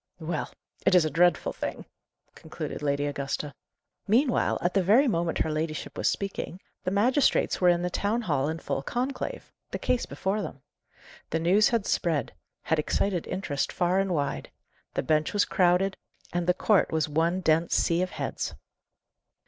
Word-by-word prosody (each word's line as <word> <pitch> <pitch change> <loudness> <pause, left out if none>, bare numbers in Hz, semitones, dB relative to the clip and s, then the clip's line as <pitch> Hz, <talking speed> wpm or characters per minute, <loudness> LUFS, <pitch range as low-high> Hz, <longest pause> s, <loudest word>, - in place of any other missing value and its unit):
"Well, 160 -1 -3 0.3
it - - +4
is 175 -3 +6
a 155 - -1
dreadful 175 +1 +3
thing!" - - -5 0.5
concluded - - -7
Lady 145 0 0
Augusta. 140 0 -3 0.5
Meanwhile, 245 +5 +3
at 175 - 0
the 195 - +3
very 220 +10 +5
moment 170 -7 0
her 160 - 0
ladyship 155 0 -3
was - - +1
speaking, 195 -2 -4 0.2
the - - 0
magistrates 240 +8 +2
were 180 - +6
in 175 0 +2
the 180 - -1
town 215 +6 0
hall 145 -6 0
in 160 - -2
full 135 - -3
conclave 260 - -3 0.2
the - - -3
case 250 - 0
before 200 +3 -2
them. 135 -8 -7 0.7
The 160 - 0
news 185 +6 +4
had 230 -4 0
spread 165 -5 0 0.3
had 160 - +1
excited 180 +3 0
interest 160 -7 -2
far 180 +2 +1
and 195 -1 0
wide; 145 -4 -2 0.5
the - - 0
bench 155 +3 +1
was 205 - +3
crowded, 185 +1 +2 0.4
and 175 0 -1
the 180 - +4
court 205 +1 +3
was 160 -1 +1
one 165 +5 +1
dense 165 0 +2
sea 170 +1 +2
of 185 - 0
heads. - - -4
175 Hz, 170 wpm, -27 LUFS, 155-195 Hz, 0.7 s, is